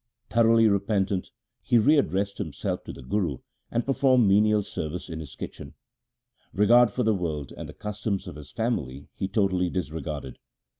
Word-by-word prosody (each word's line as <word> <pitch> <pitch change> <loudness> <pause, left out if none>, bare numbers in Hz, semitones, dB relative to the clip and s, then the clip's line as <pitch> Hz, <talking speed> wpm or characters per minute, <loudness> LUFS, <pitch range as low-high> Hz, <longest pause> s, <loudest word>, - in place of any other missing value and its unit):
Thoroughly 115 -1 +5
repentant, 100 -2 0 0.3
he 120 - +3
re 140 +8 +5
addressed 100 -5 -1
himself - - -3
to - - -6
the 70 - -11
Guru, 80 0 -1 0.3
and 120 - -1
performed 130 -4 +3
menial 105 +1 +4
service 85 0 -5
in 80 -1 -5
his 75 -4 -9
kitchen. - - -8 0.8
Regard 120 +4 +5
for 125 +5 -2
the 110 -1 +3
world 80 -7 -3
and - - -8
the - - -9
customs 105 -1 -3
of - - -8
his 75 -2 -11
family 70 - -3
he 95 - -3
totally 95 -3 +1
disregarded. 75 -6 -5
100 Hz, 160 wpm, -26 LUFS, 80-110 Hz, 0.8 s, Thoroughly